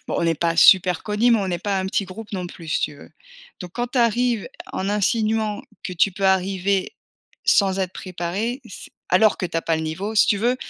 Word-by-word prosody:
bon, -, -, -2 dB
on 170 Hz, -, +1 dB
est 165 Hz, -, +2 dB
pas 165 Hz, -1 st, 0 dB
super 180 Hz, -2 st, +6 dB
connus 215 Hz, +3 st, +1 dB
mais 230 Hz, -, +5 dB
on 195 Hz, -2 st, -2 dB
est 175 Hz, -, -1 dB
pas 200 Hz, -2 st, 0 dB
un 190 Hz, -, -2 dB
petit 190 Hz, +1 st, -1 dB
groupe 210 Hz, +3 st, -10 dB
non 180 Hz, -2 st, -3 dB
plus 165 Hz, -2 st, -11 dB
si -, -, 0 dB
tu -, -, -2 dB
veux. -, -, -15 dB, 0.5 s
Donc 180 Hz, -1 st, -8 dB
quand 240 Hz, 0 st, -1 dB
tu 250 Hz, -, -2 dB
arrives 235 Hz, -1 st, +1 dB, 0.2 s
en 190 Hz, -, -2 dB
insinuant 215 Hz, +1 st, 0 dB, 0.2 s
que 185 Hz, -, -5 dB
tu 180 Hz, +3 st, +2 dB
peux 195 Hz, +2 st, -5 dB
arriver, 190 Hz, 0 st, +1 dB, 0.5 s
sans 195 Hz, -2 st, +3 dB
être 185 Hz, -1 st, -2 dB
préparé 190 Hz, -, -4 dB
c'est -, -, -10 dB, 0.2 s
alors 215 Hz, -2 st, +4 dB
que -, -, -3 dB
tu 165 Hz, -, -5 dB
as 165 Hz, -, -1 dB
pas 165 Hz, -, 0 dB
le 160 Hz, -, -3 dB
niveau, 185 Hz, +8 st, -4 dB
si 215 Hz, -, +5 dB
tu 205 Hz, -, +3 dB
veux, 240 Hz, +5 st, +1 dB
195 Hz, 235 wpm, -22 LUFS, 180-220 Hz, 0.5 s, super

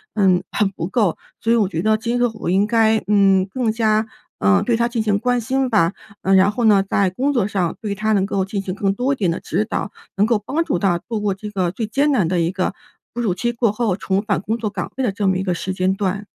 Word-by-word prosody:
嗯， 190 Hz, -4 st, +3 dB
很 205 Hz, -2 st, +1 dB
不 170 Hz, -2 st, -4 dB
够。 200 Hz, -5 st, +1 dB, 0.2 s
所 230 Hz, -, 0 dB
以 -, -, +4 dB
我 215 Hz, -4 st, +2 dB
觉 165 Hz, -3 st, -2 dB
得 215 Hz, 0 st, +3 dB
今 235 Hz, +2 st, -2 dB
后 245 Hz, -, +2 dB
我 -, -, -2 dB
应 195 Hz, +3 st, +3 dB
该， 225 Hz, -1 st, +3 dB
嗯， 195 Hz, -2 st, +4 dB
更 235 Hz, 0 st, -1 dB
加， 220 Hz, -1 st, +1 dB, 0.3 s
呃， 95 Hz, -1 st, +3 dB
对 240 Hz, -, +1 dB
她 235 Hz, +1 st, +1 dB
进 235 Hz, -2 st, -2 dB
行 205 Hz, -2 st, +1 dB
关 245 Hz, +2 st, +1 dB
心 260 Hz, +3 st, -1 dB
吧。 195 Hz, -6 st, +2 dB, 0.3 s
呃， 195 Hz, -, +2 dB
然 190 Hz, +2 st, +5 dB
后 235 Hz, +3 st, -3 dB
呢， 205 Hz, -3 st, +5 dB
在 195 Hz, -2 st, +2 dB
工 265 Hz, +9 st, 0 dB
作 220 Hz, -6 st, +1 dB
上 185 Hz, -5 st, -1 dB
对 210 Hz, -3 st, -3 dB
她 215 Hz, +2 st, -1 dB
能 195 Hz, -2 st, +2 dB
够 195 Hz, -1 st, -1 dB
进 195 Hz, +1 st, -4 dB
行 185 Hz, -2 st, -4 dB
更 195 Hz, 0 st, 0 dB
多 255 Hz, +5 st, 0 dB
一 -, -, -2 dB
点 195 Hz, -9 st, 0 dB
的 165 Hz, -, -2 dB
指 -, -, -1 dB
导， 210 Hz, -2 st, -3 dB, 0.3 s
能 200 Hz, -, +4 dB
够 225 Hz, -2 st, +1 dB
帮 295 Hz, +10 st, -1 dB
助 175 Hz, -, -1 dB
她 175 Hz, -2 st, +2 dB
度 220 Hz, +3 st, -5 dB
过 205 Hz, -2 st, 0 dB
这 210 Hz, +2 st, -7 dB
个 185 Hz, -3 st, 0 dB
最 225 Hz, +3 st, -3 dB
艰 285 Hz, +6 st, +1 dB
难 200 Hz, -11 st, +2 dB
的 175 Hz, +1 st, 0 dB
一 165 Hz, +1 st, 0 dB
个， 185 Hz, 0 st, -2 dB, 0.4 s
哺 240 Hz, -, -3 dB
乳 200 Hz, -6 st, +1 dB
期 240 Hz, +6 st, -1 dB
过 230 Hz, -3 st, +1 dB
后 210 Hz, -3 st, 0 dB
重 195 Hz, 0 st, -1 dB
返 205 Hz, -2 st, -1 dB
工 220 Hz, +3 st, -2 dB
作 220 Hz, -2 st, -3 dB
岗 195 Hz, -4 st, -5 dB
位 265 Hz, -, -1 dB
的 245 Hz, -, +2 dB
这 205 Hz, +1 st, -3 dB
么 190 Hz, -1 st, +2 dB
一 190 Hz, -, -2 dB
个 185 Hz, -2 st, 0 dB
时 185 Hz, +2 st, -4 dB
间 185 Hz, +1 st, +1 dB
段。 195 Hz, +1 st, -2 dB
205 Hz, 295 characters per minute, -20 LUFS, 190-230 Hz, 0.4 s, 然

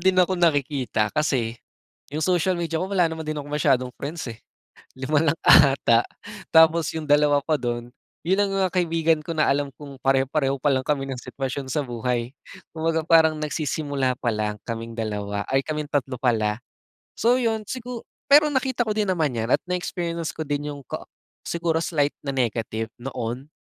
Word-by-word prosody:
din 190 Hz, +1 st, +3 dB
akong 180 Hz, 0 st, +3 dB
nakikita. 140 Hz, -9 st, +1 dB
Kasi 125 Hz, -7 st, 0 dB, 0.5 s
'yong 155 Hz, +2 st, -2 dB
social 180 Hz, 0 st, +2 dB
media 165 Hz, -1 st, -2 dB
ko 185 Hz, -, -2 dB
wala 195 Hz, -3 st, +3 dB
naman 160 Hz, 0 st, -6 dB
din 155 Hz, -, -2 dB
akong 145 Hz, 0 st, -6 dB
masyadong 130 Hz, -4 st, +1 dB
friends, 155 Hz, +4 st, -4 dB
eh. 110 Hz, -, -16 dB, 0.6 s
5 145 Hz, +3 st, +1 dB
lang 165 Hz, -, -10 dB
ata, 130 Hz, -4 st, +6 dB, 0.5 s
tapos 160 Hz, 0 st, +5 dB
'yong 160 Hz, -2 st, -5 dB
dalawa 145 Hz, 0 st, +4 dB
pa 155 Hz, -2 st, +2 dB
do'n, 120 Hz, -2 st, -3 dB, 0.4 s
'yon 185 Hz, +3 st, +2 dB
lang 200 Hz, -, +2 dB
ang 190 Hz, -2 st, +1 dB
kaibigan 165 Hz, -3 st, +2 dB
ko 165 Hz, -, -4 dB
na 155 Hz, -, +3 dB
alam 140 Hz, 0 st, 0 dB
kung 140 Hz, -2 st, -10 dB
pareho-pareho 135 Hz, +1 st, +1 dB
pa 145 Hz, -, +2 dB
lang 130 Hz, -1 st, 0 dB
kami 140 Hz, -2 st, 0 dB
ng 130 Hz, -2 st, -5 dB
sitwasyon 135 Hz, 0 st, -5 dB
sa 150 Hz, -, +1 dB
buhay, 120 Hz, 0 st, -2 dB, 0.4 s
kumbaga 160 Hz, 0 st, 0 dB
parang 160 Hz, -2 st, +5 dB
nagsisimula 145 Hz, -3 st, -1 dB
pa -, -, -1 dB
lang 105 Hz, 0 st, -2 dB
kaming 115 Hz, 0 st, -5 dB
2, 105 Hz, -2 st, -3 dB
ay 135 Hz, -, +4 dB
kaming 150 Hz, -1 st, -3 dB
3 135 Hz, -3 st, -1 dB
pala. 110 Hz, -3 st, +1 dB, 0.6 s
So 240 Hz, +3 st, +4 dB
'yon, 220 Hz, -3 st, -1 dB
sigu 250 Hz, -2 st, -6 dB, 0.2 s
pero 300 Hz, +2 st, +7 dB
nakita 260 Hz, -3 st, 0 dB
ko 215 Hz, -, 0 dB
din 210 Hz, -2 st, 0 dB
naman 155 Hz, -7 st, 0 dB
'yan 115 Hz, +1 st, -2 dB
at -, -, +2 dB
na-experience 170 Hz, -2 st, -3 dB
ko 155 Hz, -, -5 dB
din 145 Hz, +1 st, -2 dB
'yong 140 Hz, -1 st, -8 dB
kaa -, -, -6 dB, 0.4 s
siguro 170 Hz, -1 st, 0 dB
slight 145 Hz, -4 st, 0 dB
na 140 Hz, -, -3 dB
negative 115 Hz, -3 st, -2 dB
noon. 125 Hz, +1 st, -5 dB
145 Hz, 180 wpm, -24 LUFS, 130-165 Hz, 0.6 s, pero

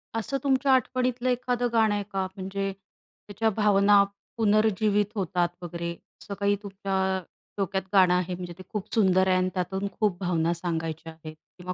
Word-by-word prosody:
असं 225 Hz, +5 st, -1 dB
तुमच्या 270 Hz, 0 st, +2 dB
आठवणीतलं 255 Hz, -1 st, +1 dB
एखादं 245 Hz, 0 st, 0 dB
गाणं 220 Hz, -2 st, +4 dB
आहे 205 Hz, -, -1 dB
का? 190 Hz, -1 st, 0 dB
म्हणजे 195 Hz, +1 st, -3 dB
त्याच्या 205 Hz, +2 st, -5 dB
भावना 205 Hz, -1 st, +5 dB, 0.3 s
पुनर्जीवित 210 Hz, -1 st, +3 dB
होतात 180 Hz, -3 st, 0 dB
वगैरे, 170 Hz, 0 st, -4 dB, 0.3 s
असं 200 Hz, -, -7 dB
काही 200 Hz, 0 st, +2 dB
तुमच्या, 190 Hz, -1 st, -1 dB, 0.4 s
डोक्यात 195 Hz, -1 st, -1 dB
गाणं 185 Hz, -2 st, +6 dB
आहे? 180 Hz, 0 st, 0 dB
म्हणजे 175 Hz, -1 st, -7 dB
ते 185 Hz, -, -10 dB
खूप 210 Hz, -3 st, -5 dB
सुंदर 190 Hz, -3 st, +4 dB
आहे 185 Hz, -1 st, +4 dB
आणि 185 Hz, 0 st, +1 dB
त्यातून 190 Hz, +2 st, -2 dB
खूप 205 Hz, -5 st, +1 dB
भावना 170 Hz, -3 st, +1 dB
सांगायच्या 165 Hz, -2 st, -4 dB
आहेत 155 Hz, -1 st, -10 dB, 0.2 s
किंवा 180 Hz, 0 st, -5 dB
195 Hz, 160 wpm, -26 LUFS, 180-215 Hz, 0.4 s, गाणं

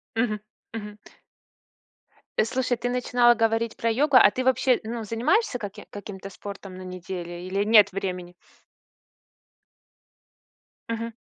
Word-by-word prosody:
Мгм. 220 Hz, -2 st, 0 dB, 0.3 s
Мгм. 210 Hz, -2 st, -7 dB, 1.4 s
Э, -, -, +5 dB
слушай, 250 Hz, 0 st, -1 dB
ты 245 Hz, -, -3 dB
начинала 245 Hz, -1 st, +4 dB
говорить 225 Hz, 0 st, 0 dB
про 230 Hz, 0 st, 0 dB
йогу. 280 Hz, +3 st, +2 dB
А 205 Hz, -, +8 dB
ты 255 Hz, 0 st, -3 dB
вообще, 260 Hz, -1 st, +3 dB
ну, 230 Hz, 0 st, -4 dB
занимаешься 245 Hz, -, +1 dB
каким 210 Hz, 0 st, -7 dB
каким-то 200 Hz, -1 st, -8 dB
спортом 195 Hz, -1 st, -9 dB
на 185 Hz, -, -9 dB
неделе 180 Hz, -1 st, -6 dB
или 200 Hz, +2 st, 0 dB
нет 210 Hz, -2 st, +6 dB
времени? 180 Hz, -2 st, -4 dB, 2.6 s
Мгм. 230 Hz, 0 st, -3 dB
220 Hz, 125 wpm, -25 LUFS, 195-240 Hz, 2.6 s, А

